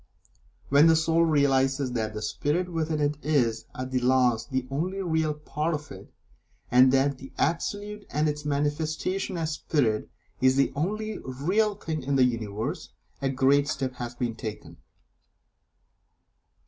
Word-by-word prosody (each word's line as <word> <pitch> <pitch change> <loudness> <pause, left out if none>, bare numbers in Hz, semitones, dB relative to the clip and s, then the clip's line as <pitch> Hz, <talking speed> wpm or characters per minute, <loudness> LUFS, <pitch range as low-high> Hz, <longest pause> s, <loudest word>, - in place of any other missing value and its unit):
When 145 +3 +6
the 165 - +6
Soul 165 +1 +3
realizes 135 -3 +2
that 110 -3 -2
the 105 - -4
Spirit 170 +10 -1
within 160 -1 -1
it 145 0 0
is, 120 -7 +1
at 130 0 -5
the 130 - +1
last, 125 -2 +2
the 130 -2 -1
only 180 +8 -2
real 160 -3 0
part 150 +2 -2
of 150 0 -8
it, - - -11 0.6
and 130 +1 +7
that 135 0 +2
the 135 - -10
Absolute 205 +5 -2
and 150 +1 +1
its 150 0 -2
manifestation 155 +6 -1
as 160 -1 -1
Spirit 135 -8 0 0.3
is 130 0 +4
the 135 0 +2
only 215 +8 -2
real 185 +12 0
thing 160 -6 -4
in 135 +1 -1
the 130 - +5
Universe, 110 -3 -3 0.3
a 135 - +1
great 135 +2 +3
step 135 -2 -2
has 120 0 -5
been 120 -1 -2
taken. 110 -1 -7
145 Hz, 150 wpm, -27 LUFS, 130-160 Hz, 0.6 s, and